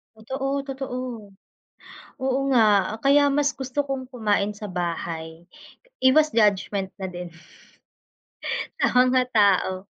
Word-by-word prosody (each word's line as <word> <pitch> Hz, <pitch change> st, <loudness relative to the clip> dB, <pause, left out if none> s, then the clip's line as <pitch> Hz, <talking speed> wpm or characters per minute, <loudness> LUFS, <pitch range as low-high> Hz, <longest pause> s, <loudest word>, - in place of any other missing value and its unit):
Totoo, 270 Hz, +5 st, -3 dB
totoo, 270 Hz, -2 st, -5 dB, 1.3 s
oo 265 Hz, 0 st, 0 dB
nga, 235 Hz, -, +5 dB, 0.4 s
kaya 285 Hz, +1 st, +5 dB
mas 285 Hz, -1 st, +3 dB
gusto 265 Hz, +2 st, -1 dB
kong 265 Hz, -1 st, -3 dB
kumain 210 Hz, -3 st, 0 dB
sa 210 Hz, -1 st, -8 dB
bahay, 165 Hz, -2 st, -4 dB, 0.6 s
iwas 300 Hz, +4 st, +5 dB
judgment 200 Hz, -2 st, +1 dB
na 190 Hz, -, -3 dB
din, 175 Hz, -1 st, -8 dB, 1.5 s
sa -, -, +3 dB
mga 255 Hz, 0 st, +4 dB
tao. 195 Hz, -2 st, +2 dB
220 Hz, 110 wpm, -24 LUFS, 190-265 Hz, 1.5 s, nga